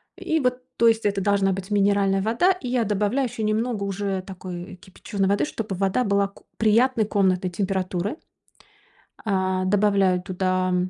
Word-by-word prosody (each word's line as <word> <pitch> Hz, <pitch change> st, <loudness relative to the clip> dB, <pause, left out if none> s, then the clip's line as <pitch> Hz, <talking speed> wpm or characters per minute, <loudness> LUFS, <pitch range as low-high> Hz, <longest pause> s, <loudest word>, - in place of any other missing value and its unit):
И 320 Hz, 0 st, -1 dB
вот, 250 Hz, -1 st, 0 dB, 0.2 s
то 235 Hz, -, +4 dB
есть 225 Hz, -1 st, +2 dB
это 200 Hz, -1 st, +1 dB
должна 195 Hz, 0 st, +2 dB
быть 190 Hz, +2 st, -5 dB
минеральная 200 Hz, -1 st, +2 dB
вода. 235 Hz, -, +2 dB
И 320 Hz, -10 st, -4 dB
я 245 Hz, -3 st, +1 dB
добавляю 210 Hz, +6 st, 0 dB
еще 230 Hz, -2 st, -5 dB
немного 215 Hz, 0 st, 0 dB
уже 195 Hz, -1 st, -2 dB
такой 185 Hz, -1 st, -8 dB
кипяченой 190 Hz, +2 st, -4 dB
воды, 200 Hz, +1 st, +2 dB
чтобы 220 Hz, -9 st, -4 dB
и -, -, -8 dB
вода 200 Hz, +6 st, +1 dB
была 200 Hz, 0 st, +1 dB
ку -, -, -21 dB
приятной 225 Hz, +1 st, +3 dB
комнатной 185 Hz, -3 st, +1 dB
температуры. 190 Hz, -, -2 dB, 1.0 s
А, 190 Hz, -2 st, -1 dB
добавляю 195 Hz, -2 st, +2 dB
туда, 185 Hz, 0 st, -1 dB
м 180 Hz, 0 st, 0 dB
200 Hz, 165 wpm, -24 LUFS, 190-220 Hz, 1.0 s, то